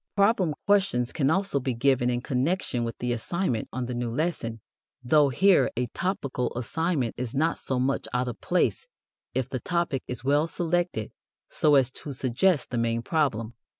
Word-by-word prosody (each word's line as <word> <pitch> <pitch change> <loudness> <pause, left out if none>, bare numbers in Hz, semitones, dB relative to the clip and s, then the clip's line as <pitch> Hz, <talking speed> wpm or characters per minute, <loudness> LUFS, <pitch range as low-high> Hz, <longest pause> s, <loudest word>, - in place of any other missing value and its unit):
Problem 200 -6 +3
questions 195 -12 +2
can 140 -4 +1
also 190 -3 +1
be 130 -2 -2
given 125 0 +2
in 120 0 0
connection 130 0 -1
with 115 0 -4
the 125 0 -1
assignment 120 - -2
on 130 -1 -3
the 125 - -4
new 120 0 -2
lesson, 115 -4 -2 0.4
though 145 +3 +4
here 190 +8 +4
a 125 - +1
topical 140 -9 -2
assignment 145 0 -1
is 125 0 -4
not 160 +4 +1
so 130 -2 -2
much 135 +2 0
out 125 0 0
of 120 - -6
place 185 - 0 0.5
if 130 -2 0
the 130 -1 -4
topic 170 -4 -1
is 125 -1 -5
well 145 +4 +3
selected 170 -9 -1 0.4
so 150 -1 +3
as 130 -2 +4
to 145 +1 -6
suggest 135 +6 +1
the 120 - 0
main 115 0 0
problem. 120 -8 0
135 Hz, 175 wpm, -27 LUFS, 120-165 Hz, 0.5 s, though